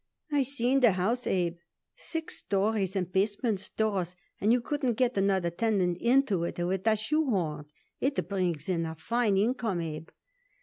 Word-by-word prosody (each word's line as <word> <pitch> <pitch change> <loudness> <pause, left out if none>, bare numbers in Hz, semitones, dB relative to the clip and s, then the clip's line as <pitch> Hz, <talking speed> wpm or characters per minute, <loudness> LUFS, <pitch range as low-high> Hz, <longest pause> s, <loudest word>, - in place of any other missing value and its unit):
I 290 -1 +3
seen 265 0 +2
the 240 -6 +5
house, 225 +7 -1
Abe, 175 -2 0 0.4
six 325 -1 -5
stories 200 -1 0
and 180 -2 -1
basement 205 +2 +1
stores, 195 -4 -2 0.2
and 210 - +3
you 245 - +4
couldn't 250 -2 -1
get 250 -1 +2
another 195 -3 +1
tenant 185 -3 +1
into 235 -7 +3
it 170 - -3
with 185 +4 -1
a 220 - +5
shoehorn. 210 - 0 0.3
It 270 - 0
brings 180 -6 -1
in 170 -3 0
a 160 - -6
fine 215 +4 +1
income, 220 -3 0
Abe." 160 -1 -5
200 Hz, 160 wpm, -29 LUFS, 180-240 Hz, 0.4 s, the